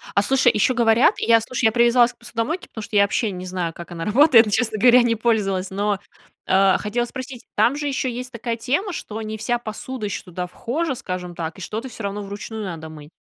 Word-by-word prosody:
А, 200 - +5
слушай, 255 +2 +3
ещё 215 +5 +2
говорят, 235 - +4
я, 230 -1 +4
слушай, 230 +1 -2
я 220 - +5
привязалась 240 +1 +4
к - - -40
посудомойке, 235 +8 -4
потому 220 - -8
что 210 - -7
я 200 - +6
вообще 205 +1 0
не 180 0 -7
знаю, 180 -3 -3
как 170 +1 -10
она 165 -1 -5
работает, 235 +1 +6
но, 210 - -4
честно 220 -1 0
говоря, 245 +2 +7
не 230 -1 +2
пользовалась. 200 -5 0
Но, 200 +1 -1 0.5
э, 190 0 +4
хотела 235 +3 -1
спросить, 255 0 -8
там 225 +6 +3
же 290 0 -3
ещё 265 -1 -1
есть 250 +1 -6
такая 235 0 -3
тема, 320 - -1
что 220 -6 -6
не 215 0 -5
вся 240 +2 -1
посуда 230 +1 -6
ещё 200 - -4
туда 180 0 -5
вхожа, 260 - -3
скажем 180 -4 -6
так, 165 0 -5
и - - -10
что-то 220 +8 -5
всё 225 - -9
равно 200 +1 -3
вручную 205 +2 -6
надо 165 -5 -6
мыть? 150 -1 -12
220 Hz, 225 wpm, -22 LUFS, 195-245 Hz, 0.5 s, говоря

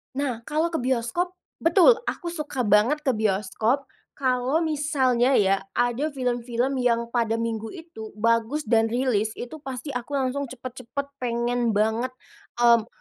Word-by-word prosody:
Nah, 265 -4 -1
kalau 315 +3 0
ke 325 - -1
bioskop, 260 +9 -1 0.2
betul 375 +8 +5
aku 345 - -3
suka 300 -6 -3
banget 225 +8 +3
ke 270 - +3
bioskop 215 +4 0 0.3
kalau 260 +4 +1
misalnya 275 -5 +2
ya, 195 -1 +3 0.2
ada 245 +4 +1
film-film 250 -1 -1
yang 235 -1 +1
pada 230 -2 +1
minggu 225 -1 -2
itu 275 -12 -10
bagus 230 +6 +1
dan 225 -2 +3
rilis 225 -3 0
itu 280 +6 -7
pasti 270 0 -6
aku 250 +2 -4
langsung 275 +1 -1
cepet-cepet 255 +2 -6
pengen 240 -1 0
banget, 220 +4 0 0.4
mmm, 235 -2 +4
250 Hz, 140 wpm, -25 LUFS, 230-280 Hz, 0.4 s, betul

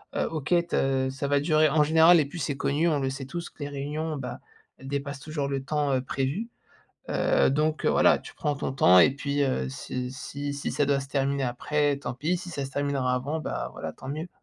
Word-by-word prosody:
Heu, - - +1
OK, 155 +1 -2
te 135 -3 +1
ça 140 +2 -3
va 145 0 +3
durer, 155 +1 +3
en 150 +1 +4
général 160 +2 +6
et 150 - +2
puis 145 +5 -8
c'est 145 -4 -2
connu, 150 +5 +1
on 150 -3 +1
le 135 -1 0
sait 135 0 -5
tous 170 +5 -6
que - - -31
les 145 - -4
réunions, 150 +2 -3
bah, 125 -2 -6 0.4
elles 135 - -11
dépassent 140 0 -3
toujours 150 -2 -3
le 135 -1 -2
temps, 145 0 0
heu, 130 - +1
prévu. 135 - -2 0.6
Heu - - +3
donc 155 +3 0
heu, - - +4
voilà, - - +4
tu - - -12
prends 150 - -1
ton 135 - -3
temps 90 -8 +6
et 125 - +7
puis 140 0 -1
heu, 65 - 0
si 125 - -5
si 140 +2 -5
si 140 - -3
ça 145 - +1
doit 140 0 +2
se 135 - -7
terminer 140 0 0
après, 145 +3 0
tant 125 -3 -5
pis 155 +8 -1
si 180 0 -8
ça 140 -4 -3
se 135 - -8
terminera 140 -3 0
avant, 140 +5 -2
ben, - - -4
voilà, - - -5
tant 130 - -11
mieux. 155 +5 -4
140 Hz, 235 wpm, -27 LUFS, 135-155 Hz, 0.6 s, et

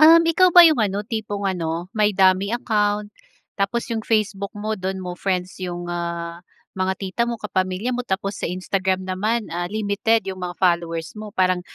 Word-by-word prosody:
um, 325 +2 +9
ikaw 360 +3 +5
ba 350 0 +9
yung 310 -7 +5
ano, 205 0 0
tipong 210 -2 -4
ano, 175 -1 -2
may 210 -2 +1
dummy 190 +1 +4
account 210 -3 0 0.5
tapos 230 +4 0
yung 225 - -1
Facebook 205 -3 0
mo 215 +1 -2
dun 190 -2 -3
mo 180 - -4
friends 185 0 -3
yung, 175 -1 -4
ah, 170 0 -4 0.3
mga 190 0 -1
tita 195 +4 -2
mo, 235 - -2
kapamilya 195 +2 -2
mo. 245 - -1
Tapos 195 +1 -2
sa - - -1
Instagram 185 +1 -1
naman, 210 +5 -1
ah, 175 +1 -2
limited 215 +2 +1
yung 190 -1 -5
mga 180 -1 -5
followers 170 -2 0
mo. 215 0 -8
Parang, 185 -1 +2
195 Hz, 180 wpm, -22 LUFS, 185-215 Hz, 0.5 s, um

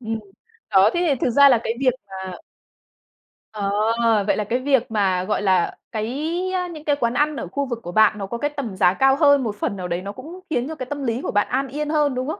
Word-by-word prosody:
Ừm. 225 -2 -4 0.5
Đó, 195 -1 +5
thế 345 - +1
thì 285 - +3
thực - - +1
ra 280 +4 +7
là 245 -4 +4
cái 225 - -1
việc 260 -2 +3
mà 190 -1 -7 1.2
Ờ. 215 +2 +1
Vậy - - +2
là 210 - 0
cái 235 +5 -1
việc 260 -2 +1
mà, 190 -4 +1
gọi 210 +2 -1
là, 190 -3 +1
cái 250 +8 -3 0.4
những 305 -1 -10
cái 290 - +2
quán 235 -4 -1
ăn 295 +4 +1
ở - - -5
khu 280 0 -2
vực 240 -3 -4
của 175 - -6
bạn 215 +2 +4
nó 200 - -4
có 235 - -4
cái 290 +5 -1
tầm 275 -9 -5
giá 180 -1 +4
cao 270 +6 +3
hơn, 285 -2 +4
một 215 -3 -3
phần 205 - -2
nào 180 -1 -4
đấy 175 +1 -2
nó 200 +2 -6
cũng 325 - -10
khiến 255 -5 -1
cho 320 - -6
cái 260 - -6
tâm 285 +2 -5
lý 235 0 -1
của - - -3
bạn 205 0 +1
an 270 +2 -1
yên 295 +3 -4
hơn, 300 -3 +1
đúng 255 +1 -3
không? 315 - -4
235 Hz, 255 wpm, -22 LUFS, 205-280 Hz, 1.2 s, ra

